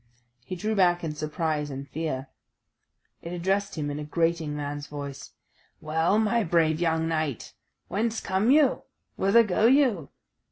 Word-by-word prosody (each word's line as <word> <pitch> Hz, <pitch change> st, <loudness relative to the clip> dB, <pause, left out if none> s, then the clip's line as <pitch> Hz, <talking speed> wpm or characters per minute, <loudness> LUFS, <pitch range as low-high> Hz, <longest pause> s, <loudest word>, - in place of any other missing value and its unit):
He 185 Hz, -, -6 dB
drew 215 Hz, +5 st, -2 dB
back 175 Hz, -4 st, +3 dB
in 160 Hz, -2 st, -2 dB
surprise 155 Hz, 0 st, -2 dB
and 135 Hz, 0 st, -6 dB
fear. 140 Hz, -2 st, -3 dB, 1.0 s
It 170 Hz, -, -7 dB
addressed 195 Hz, +3 st, -1 dB
him 145 Hz, -1 st, -2 dB
in 145 Hz, -, -4 dB
a -, -, -4 dB
grating 165 Hz, 0 st, 0 dB
man's 145 Hz, 0 st, -5 dB
voice: 140 Hz, -2 st, -8 dB, 0.5 s
"Well, 160 Hz, +5 st, +1 dB
my 220 Hz, +1 st, +2 dB
brave 160 Hz, -3 st, +2 dB
young 160 Hz, -1 st, +1 dB
knight, 155 Hz, -6 st, -2 dB, 0.3 s
whence 225 Hz, +2 st, -1 dB
come 190 Hz, +5 st, 0 dB
you? 285 Hz, -1 st, +4 dB, 0.3 s
whither 200 Hz, +4 st, +5 dB
go 215 Hz, +2 st, +2 dB
you? 245 Hz, -, +3 dB
165 Hz, 150 wpm, -26 LUFS, 150-200 Hz, 1.0 s, whither